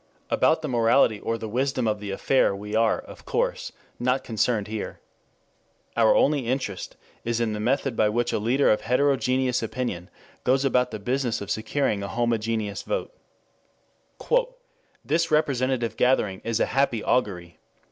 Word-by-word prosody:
About 160 - +3
the - - -1
morality 115 -3 +3
or 115 +2 -2
the 110 - -6
wisdom 130 +1 0
of 105 -1 0
the 105 -1 -6
affair 100 +2 +2
we 105 +1 -7
are, 115 0 +3
of - - -12
course, - - -1 0.3
not 125 +2 +1
concerned 110 -1 0
here. 110 -1 -5 1.0
Our 115 -2 +4
only 140 -4 +2
interest 120 -7 -3 0.3
is 115 0 -1
in 115 -2 0
the 105 - -4
method 130 +3 0
by 110 -1 +3
which 120 +2 0
a - - +1
leader 125 +6 +3
of 105 - +2
heterogeneous 130 0 +1
opinion 110 -6 -4 0.3
goes 135 +2 +2
about 125 -2 +2
the 110 - -5
business 120 +2 -1
of 100 -4 -6
securing 110 - 0
a 100 - -4
homogeneous 115 -2 -1
vote. - - -3 1.9
"This 165 +2 +1
representative 130 -6 +1
gathering 105 -7 +2
is 115 -1 -1
a - - +3
happy 135 -5 +1
augury. 90 -9 -1
115 Hz, 155 wpm, -25 LUFS, 105-130 Hz, 1.9 s, Our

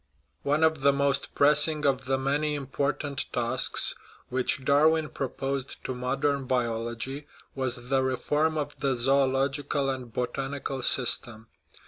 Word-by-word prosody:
One 150 +3 +1
of 160 -2 +2
the 140 +1 +5
most 140 0 0
pressing 150 +1 +4
of 135 -1 +1
the 135 +1 +1
many 145 +3 0
important 140 +1 -2
tasks 120 +1 +1 0.4
which 130 +1 0
Darwin 155 +2 +3
proposed 135 0 -3
to 130 - -3
modern 135 +2 -1
biology 120 +3 -2 0.3
was 130 -2 -1
the 135 0 +2
reform 150 +4 0
of 145 -1 -4
the 135 -1 +1
zoological 135 +2 +1
and 130 -3 -6
botanical 135 +3 -3
system. 120 -3 +1
135 Hz, 125 wpm, -27 LUFS, 130-145 Hz, 0.4 s, the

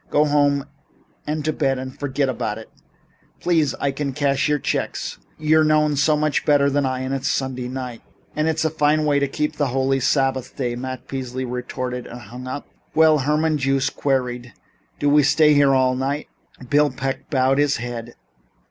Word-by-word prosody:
Go 150 +1 +3
home 145 -1 +2 0.6
and 150 0 -2
to 155 - +1
bed 135 -3 0
and 130 0 -6
forget 140 0 -1
it." 110 -3 -4 0.7
"Please. 160 -6 +1
You 140 - +1
can 140 -1 -3
cash 140 +1 +1
your 150 - +3
checks. - - -3 0.2
You're 155 +1 +3
known 150 -1 +3
so 150 +2 +3
much 155 -1 0
better 140 -1 +3
than 140 -1 +1
I, 130 0 -2
and 130 +1 -3
it's 135 0 -2
Sunday 130 -3 -1
night 125 -2 -6 0.2
" - - -34
"And 155 +1 +1
it's 160 0 0
a 160 - +1
fine 150 0 +2
way 145 -1 +3
to 140 - +1
keep 150 +2 -2
holy 135 -1 +1
the - - -4
Sabbath 130 -2 0
day," 120 -3 -2
Matt 130 +1 -6
Peasley 130 -1 -4
retorted 125 0 -4
and 120 - -9
hung 125 +1 -9
up. 130 +3 -5 0.3
"Well," 155 -1 +5
Herman 150 +2 +1
Joost 135 -1 0
queried, 125 -4 -1 0.4
"do 145 - 0
we 145 +1 +5
stay 150 +2 +4
here 140 -2 +4
all 130 -1 +3
night?" 140 +3 -2 0.4
Bill 145 +2 +3
Peck 135 +1 -4
bowed 135 0 +2
his 145 -1 +2
head. 120 0 -6
135 Hz, 185 wpm, -22 LUFS, 130-150 Hz, 0.7 s, Well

